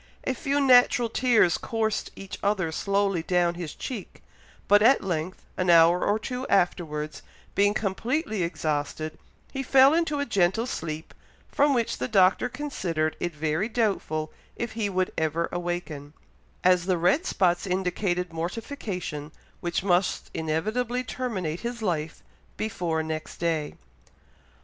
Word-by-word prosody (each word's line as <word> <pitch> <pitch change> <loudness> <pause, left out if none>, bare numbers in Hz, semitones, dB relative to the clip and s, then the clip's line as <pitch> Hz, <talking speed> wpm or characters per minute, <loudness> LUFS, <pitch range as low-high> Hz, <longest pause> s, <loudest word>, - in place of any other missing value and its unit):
A 260 - 0
few 280 +3 -1
natural 245 -3 +5
tears 225 -8 +3
coursed 220 -2 -1
each 195 -1 -8
other 195 -5 0
slowly 200 0 0
down 175 0 +1
his 170 -3 -6
cheek; 230 -7 -7 0.4
but 205 0 +6
at 255 +5 +5
length, 180 -1 -3
an 185 -1 0
hour 170 +1 +6
or 205 - +2
two 250 +4 -5
afterwards, 155 -5 0 0.3
being 205 +1 +3
completely 220 - -1
exhausted, 155 -2 -2 0.3
he 270 - -2
fell 270 +2 +6
into 325 -3 +1
a 285 - 0
gentle 200 0 +2
sleep, 160 -9 -5 0.4
from 285 -1 +3
which 235 -2 -1
the 125 - -1
Doctor 190 - +4
considered 185 - -2
it 175 -2 -3
very 155 +7 -1
doubtful 195 -9 -1 0.2
if 235 -1 -4
he 220 -2 -2
would 185 -1 -1
ever 160 +1 0
awaken, 175 -5 -4 0.5
as 180 -1 +4
the 185 -2 +2
red 180 - +2
spots 175 0 +1
indicated 180 -1 -1
mortification, 175 - -5 0.3
which 175 +1 -2
must 180 -1 +1
inevitably 215 +11 -1
terminate 190 -10 -3
his 235 -1 -5
life 160 -5 -2 0.3
before 175 -7 -1
next 155 0 -5
day. 160 -3 -1
185 Hz, 135 wpm, -26 LUFS, 165-230 Hz, 0.5 s, but